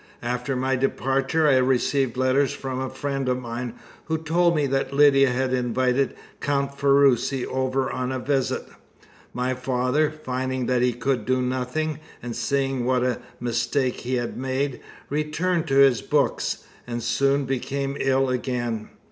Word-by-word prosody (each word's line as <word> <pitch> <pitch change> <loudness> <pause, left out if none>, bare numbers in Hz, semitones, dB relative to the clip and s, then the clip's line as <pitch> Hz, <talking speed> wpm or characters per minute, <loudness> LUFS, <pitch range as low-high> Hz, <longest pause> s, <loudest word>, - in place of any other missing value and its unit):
After 125 +2 -2
my 130 +1 +1
departure 135 +3 +1
I 135 -3 +5
received 130 0 +1
letters 130 +1 +2
from 130 -1 -4
a 130 - -2
friend 135 -1 -2
of 125 0 0
mine, 120 0 -5 0.3
who 160 +1 0
told 170 +2 +2
me 150 -2 +2
that 135 0 0
Lydia 140 -1 +5
had 130 +1 0
invited 125 +2 +1 0.2
Count 140 -1 -1
Ferruci 140 -2 +3
over 130 0 -1
on 125 0 -2
a 130 - -1
visit. 135 0 -1 0.6
My 125 +1 -1
father, 130 +3 +1
finding 130 -4 -3
that 125 -1 +1
he 125 0 +2
could 125 -1 -1
do 130 0 +2
nothing, 130 +5 -2 0.2
and 120 -2 -5
seeing 135 -2 0
what 125 0 +2
a 125 -1 0 0.2
mistake 125 +2 0
he 125 +1 -2
had 120 -1 -3
made, 130 +1 -2 0.3
returned 155 +3 0
to 135 - 0
his 135 -3 +5
books, - - 0 0.2
and 120 -1 -4
soon 140 +3 +2
became 135 +1 -2
ill 135 0 +2
again. 120 -3 -2
130 Hz, 155 wpm, -24 LUFS, 125-140 Hz, 0.6 s, I